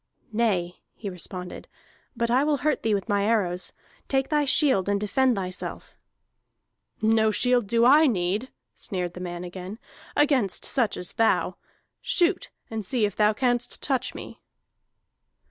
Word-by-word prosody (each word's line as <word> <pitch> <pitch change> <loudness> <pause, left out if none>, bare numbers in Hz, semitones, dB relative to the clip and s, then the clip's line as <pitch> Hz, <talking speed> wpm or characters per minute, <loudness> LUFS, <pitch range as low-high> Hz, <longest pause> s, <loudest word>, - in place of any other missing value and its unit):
"Nay," 190 -6 0 0.2
he 205 -3 -6
responded, 180 0 -6 0.5
"but 235 0 0
I 255 +3 +4
will 295 -1 +2
hurt 305 - +2
thee 220 -2 +1
with 195 - -3
my 205 -2 +1
arrows. 185 -5 0 0.4
Take 270 -1 0
thy 295 -1 +2
shield 260 - +3
and 200 0 +1
defend 245 +5 +2
thyself." 185 -2 -5 1.1
"No 220 0 +4
shield 245 0 +2
do 230 +3 +3
I 300 +5 +7
need," 205 +2 -1 0.2
sneered 180 -3 -4
the 180 - -9
man 175 -1 -5
again, 185 +3 -7 0.4
"against 275 -10 +2
such 240 -6 +1
as 180 - -5
thou. 225 0 +1 0.4
Shoot, 355 +1 +1 0.2
and 225 -1 -4
see 225 +2 +1
if 205 - -3
thou 210 0 +3
canst 245 +1 -1
touch 265 -3 -1
me!" - - -9
220 Hz, 145 wpm, -25 LUFS, 185-255 Hz, 1.1 s, I